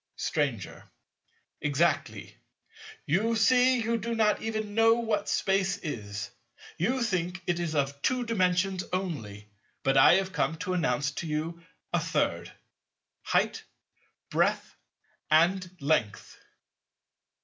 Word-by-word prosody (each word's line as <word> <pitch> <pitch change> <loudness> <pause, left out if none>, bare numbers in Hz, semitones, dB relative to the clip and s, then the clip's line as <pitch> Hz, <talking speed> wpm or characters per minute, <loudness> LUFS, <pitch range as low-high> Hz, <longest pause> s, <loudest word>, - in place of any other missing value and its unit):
Stranger. 135 - -3 0.7
Exactly: 145 - 0 0.7
you 215 +9 +1
see 255 +2 +4
you 230 +1 0
do 230 +2 -3
not 215 -2 +2
even 215 -2 -3
know 225 +1 +5
what 220 -3 -1
Space 195 0 +1
is. 105 - -6 0.5
You 245 +9 +1
think 185 -4 -2
it 175 -1 0
is 165 -2 -2
of 140 -1 -1
Two 255 -1 0
Dimensions 185 -3 +1
only; 130 - -4 0.4
but 135 0 +2
I 135 - +8
have 190 0 -1
come 160 - 0
to 185 - -3
announce 140 -5 0
to 165 +3 -5
you 160 +3 -3 0.3
a - - +3
Third—height, - - -3 0.7
breadth, - - 0 0.5
and 175 +4 +3
length. 140 -8 -1
180 Hz, 115 wpm, -28 LUFS, 145-210 Hz, 0.7 s, I